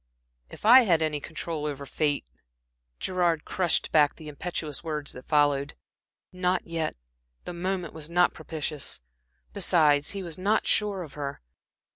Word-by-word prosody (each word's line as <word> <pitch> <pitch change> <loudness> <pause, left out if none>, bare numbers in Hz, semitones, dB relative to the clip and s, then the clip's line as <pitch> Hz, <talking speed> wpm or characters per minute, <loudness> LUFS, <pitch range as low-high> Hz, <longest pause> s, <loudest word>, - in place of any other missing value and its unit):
"If - - -10
I 250 +4 +10
had 170 -9 +3
any 155 -1 0
control 155 0 -4
over 140 -1 -5
fate" 145 - 0 0.7
Gerard 175 -4 0
crushed 180 -3 +1
back 150 -2 +4
the 155 -1 -9
impetuous 150 0 -4
words 150 -3 -2
that 125 - -11
followed. 145 -2 +2 0.6
Not 180 0 0
yet 165 -2 -2 0.5
the 180 - -5
moment 180 -1 -3
was 160 -1 -7
not 175 +1 +3
propitious. 155 -2 -3 0.5
Besides, 150 -3 +3
he 195 -1 -3
was 170 -1 -6
not 205 +4 +2
sure 205 -3 +1
of 150 - -11
her. 140 -1 -5
160 Hz, 145 wpm, -27 LUFS, 150-180 Hz, 0.7 s, I